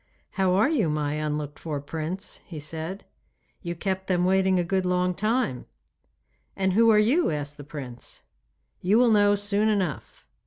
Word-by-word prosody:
'How 185 -2 +1
are 210 +8 +4
you 255 - +1
my 150 -1 -1
unlooked 150 -1 -3
for 150 -3 -4
Prince?' 160 +6 -5
he 160 -4 -8
said. 160 +6 -5 0.6
'You 175 -2 -4
kept 190 +2 -3
them 180 -1 +2
waiting 190 0 +3
a 175 - +2
good 190 +2 0
long 180 0 +1
time!' 215 - -1 0.9
'And 190 -1 +1
who 230 +3 +5
are 215 - +6
you?' 245 +12 +3
asked 145 -1 -4
the 145 - -9
prince. 135 -4 -8 0.6
'You 195 +5 +3
will 240 -1 +5
know 205 -1 +5
soon 205 +1 +1
enough. 185 - -3
185 Hz, 165 wpm, -26 LUFS, 155-205 Hz, 0.9 s, are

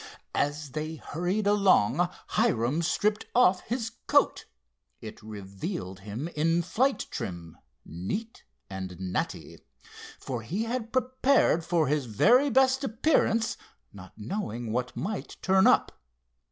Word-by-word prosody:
As 145 0 -1
they 155 +2 -4
hurried 180 +7 -2
along 185 - +3 0.2
Hiram 160 - +1
stripped 210 +5 0
off 190 -7 +5
his 230 -1 -2 0.2
coat. - - +3 0.5
It 110 -1 -10
revealed 95 -3 -6
him 105 +9 -5
in 165 +2 +1
flight 260 +10 +1
trim, 85 -7 -6 0.3
neat 150 - -5 0.2
and 95 -2 -7
natty, 95 -1 -4 0.6
for 125 -3 -4
he 180 - -3
had 230 -1 -3
prepared 255 - +2
for 170 -1 +1
his 145 -1 0
very 245 - +4
best 265 +1 +3
appearance, 225 -3 +1 0.4
not 95 -2 -12
knowing 115 - -4
what 125 +2 -2
might 200 +4 -4
turn 190 0 +4
up. - - +4
165 Hz, 120 wpm, -28 LUFS, -, 0.6 s, off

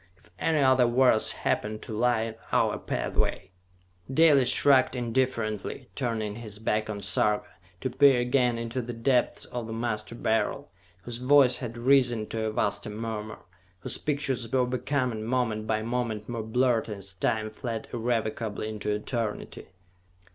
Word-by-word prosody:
If - - -25
any 160 -1 +1
other 130 -3 +4
worlds 120 -2 +3
happen 110 +1 -1
to - - -7
lie 120 0 +2
in 115 0 -5 0.2
our - - +2
pathway...." - - -2 0.6
Dalis 140 -3 +5
shrugged 135 -2 +5
indifferently, 120 -1 -2
turning 110 -5 -2
his 110 -3 -8
back 110 0 -1
on 100 -1 -4
Sarka, 105 +2 +1 0.3
to 130 - -2
peer 135 -1 +5
again 125 -1 +2
into 115 +2 -3
the 120 +1 -6
depths 120 +2 +1
of 120 -2 -5
the 115 - -5
Master 115 -1 -3
Beryl, 115 +5 -1 0.3
whose 120 +1 -5
voice 130 0 +5
had 120 -2 -6
risen 120 -3 +3
to 110 -1 -2
a 110 - -1
vaster 100 -1 -1
murmur, 110 0 -5 0.4
whose - - +1
pictures 135 -5 -2
were 130 -1 +3
becoming 125 -2 -1
moment 115 -3 -1
by 110 -1 0
moment 115 -3 -2
more 120 -2 -3
blurred 115 +1 +1
as 100 -2 -6
time 110 +3 -1
fled 115 0 -5
irrevocably 110 -2 -2
into 105 -1 -4
eternity. 105 +1 -3
115 Hz, 150 wpm, -27 LUFS, 110-125 Hz, 0.6 s, Dalis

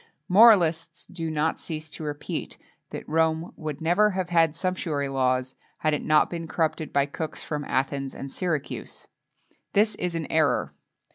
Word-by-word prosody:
Moralists 175 -6 +5
do 165 -3 -5
not 155 +1 0
cease 155 -1 -5
to - - -7
repeat 145 -1 -5 0.3
that - - -7
Rome 160 +1 +1
would 155 -3 -6
never 180 +6 +4
have 185 -3 -3
had 165 -2 +3
sumptuary 165 -6 -2
laws 130 -1 0 0.2
had 155 - +1
it 150 - -1
not 155 0 +4
been 170 -1 -5
corrupted 160 -2 -1
by 140 0 +3
cooks 155 +2 -6
from 150 -1 -3
Athens 135 +1 -1
and 135 - -7
Syracuse. 170 -6 -4 0.7
This 215 +2 +3
is 180 -1 -3
an 165 -2 -2
error. 155 -6 +2
160 Hz, 155 wpm, -26 LUFS, 145-170 Hz, 0.7 s, Moralists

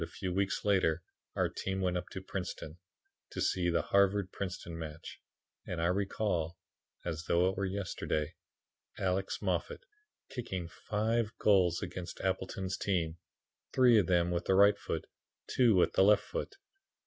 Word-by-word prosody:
A - - -4
few 95 -2 -4
weeks 100 +2 0
later 90 -5 +2 0.3
our - - +2
team 95 0 -3
went 90 -1 0
up 90 - -3
to 95 - -7
Princeton 90 -3 -5 0.5
to - - -6
see 90 -1 +1
the 85 - +1
Harvard 100 -1 +3
Princeton 90 -3 -5
match 80 -1 -8 0.5
and 90 - -3
I 85 - +1
recall, 90 -3 0 0.5
as 85 -1 -3
though 85 +2 +3
it 95 - -3
were 100 0 -1
yesterday, 90 -5 -2 0.6
Alex 95 0 -1
Moffat - - -2 0.4
kicking 95 -9 -4
five 110 +5 -1
goals 95 -3 +3
against 90 -2 -6
Appleton's 95 0 -2
team, 85 -4 -1 0.6
three 125 -4 +6
of 95 - +1
them 85 -1 +3
with 85 0 -1
the 95 - +3
right 100 +2 +7 0.2
and 80 - -1 0.4
two 120 -5 +4
with 90 - +4
the - - +5
left 105 +1 +5
foot. 395 - -5
95 Hz, 155 wpm, -32 LUFS, 85-100 Hz, 0.6 s, right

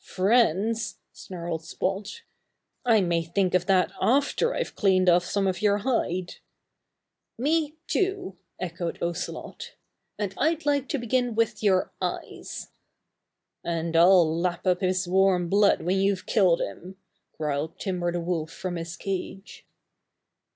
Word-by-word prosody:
"Friends!" 220 +2 +1 0.2
snarled 170 -3 -6
Spot. 195 - -4 0.6
"I 230 -4 +4
may 170 -2 +1
think 180 +3 0
of 180 0 +2
that 190 -2 +3
after 285 - +2
I've - - -3
clawed 185 -2 +2
off 175 0 +5
some 195 +2 -1
of 190 +1 -1
your 205 -1 +3
hide!" 195 -6 -1 1.0
"Me 300 +4 0
too!" 385 - -1 0.2
echoed 170 -1 -4
Ocelot. 170 +1 -5 0.4
"And 200 -3 -3
I'd 315 +2 +1
like 285 -2 +1
to 290 - 0
begin 245 -1 0
with 230 0 0
your 190 -3 +2
eyes." - - -5 0.9
"And 165 -1 -2
I'll 175 0 +6
lap 175 +1 -2
up 180 0 +2
his 185 -1 0
warm 185 -1 +3
blood 200 +1 +3
when 185 +3 +1
you've 195 -1 +1
killed 185 -5 +3
him," 185 +2 -6 0.4
growled 150 0 -2
Timber 180 -3 -2
the 175 0 -2
Wolf 165 -2 -2
from 175 +1 -5
his 165 +1 -6
cage. 195 +1 -6
185 Hz, 135 wpm, -26 LUFS, 175-220 Hz, 1.0 s, I'll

